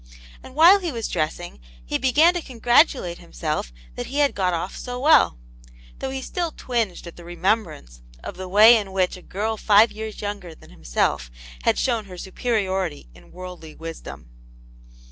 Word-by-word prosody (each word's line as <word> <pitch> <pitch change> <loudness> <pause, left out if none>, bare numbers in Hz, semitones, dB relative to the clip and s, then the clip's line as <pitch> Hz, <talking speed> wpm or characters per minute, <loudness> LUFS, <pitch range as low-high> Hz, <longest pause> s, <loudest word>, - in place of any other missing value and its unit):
And 260 - -13
while 345 +6 +7
he 350 -4 -3
was 230 -4 -3
dressing 175 +1 -3 0.3
he - - -2
began 295 +7 +4
to 350 - -3
congratulate 240 - +2
himself 155 - -4 0.2
that - - -6
he 275 - -5
had 290 -1 +3
got 185 -2 0
off 170 +2 -3
so 245 0 -6
well, 295 - +5 0.6
though 265 - -3
he 265 0 -5
still 345 +3 -2
twinged 230 -12 -3
at 170 - -11
the 175 - -11
remembrance 175 - -2 0.2
of - - -7
the 185 0 -7
way 215 +5 +8
in 200 -3 -5
which 185 -1 +1
a 185 - -12
girl 215 +5 -3
five 215 +2 +5
years 220 0 -7
younger 205 -5 -6
than - - -18
himself - - -1 0.4
had - - +3
shown 230 -4 0
her 185 -2 -11
superiority 190 - -2
in - - -18
worldly 180 -3 -10
wisdom. 165 - -9
205 Hz, 170 wpm, -23 LUFS, 175-245 Hz, 0.6 s, way